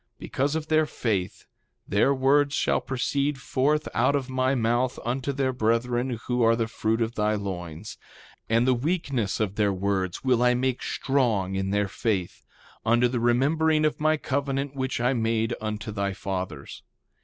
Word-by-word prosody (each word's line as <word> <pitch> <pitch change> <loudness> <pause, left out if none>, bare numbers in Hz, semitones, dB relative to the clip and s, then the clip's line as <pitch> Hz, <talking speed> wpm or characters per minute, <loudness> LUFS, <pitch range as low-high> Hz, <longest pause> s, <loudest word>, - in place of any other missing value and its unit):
3:21 - - -52
Because 140 +3 -2
of 160 -1 -3
their 155 0 +3
faith 100 -7 -2 0.4
their 105 +7 +3
words 140 +2 +3
shall - - +1
proceed 140 +3 -1
forth 145 +3 0
out 140 - +2
of 135 -2 -2
my 130 +1 +1
mouth 120 +1 +1
unto 130 +3 -1
their 135 -1 -1
brethren 120 +1 0
who 125 0 0
are 115 0 +5
the 115 -1 -1
fruit 110 0 0
of 115 +1 -3
thy 105 -1 +1
loins; 90 -2 -6 0.5
and 115 +2 +3
the 130 - +5
weakness 135 - -1
of 105 -2 -1
their 105 -2 +3
words 95 -1 -2
will 125 -3 +2
I 125 0 +4
make 130 0 -1
strong 115 -9 0
in 95 0 -1
their 100 0 +1
faith, 95 -2 -3 0.4
unto 120 +2 +3
the 120 0 -2
remembering 155 +6 +2
of 150 -1 0
my 155 0 +3
covenant 140 0 -2
which 130 -2 -2
I 125 +2 +2
made 115 -1 0
unto 110 +1 -4
thy 100 -1 -2
fathers. 95 -7 -5
120 Hz, 170 wpm, -26 LUFS, 105-135 Hz, 0.5 s, are